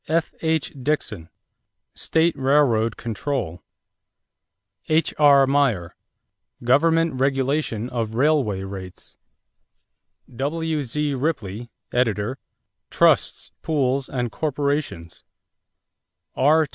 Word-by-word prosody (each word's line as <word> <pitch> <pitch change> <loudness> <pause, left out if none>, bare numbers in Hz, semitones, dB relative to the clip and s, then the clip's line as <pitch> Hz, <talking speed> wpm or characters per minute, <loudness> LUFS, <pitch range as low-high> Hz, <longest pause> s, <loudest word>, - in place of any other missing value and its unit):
F.H. 160 -1 -1
Dixon, 120 - -2 0.6
State 165 0 +1
Railroad 130 -5 +2
Control. 115 - -3 1.3
H.R. 145 -3 +4
Meyer, 130 -11 +1 0.7
Government 160 +2 +3
Regulation 135 -3 0
of 115 -3 -3
Railway 125 -8 +2
Rates. 95 -2 -9 1.2
W.Z. 150 0 -1
Ripley 120 - -3 0.2
(editor), 120 +1 0 0.5
Trusts, - - +2
Pools, 135 -3 0
and 120 -3 -2
Corporations. 140 - -3 1.1
R. 155 +3 +4
135 Hz, 70 wpm, -23 LUFS, 115-150 Hz, 1.3 s, H.R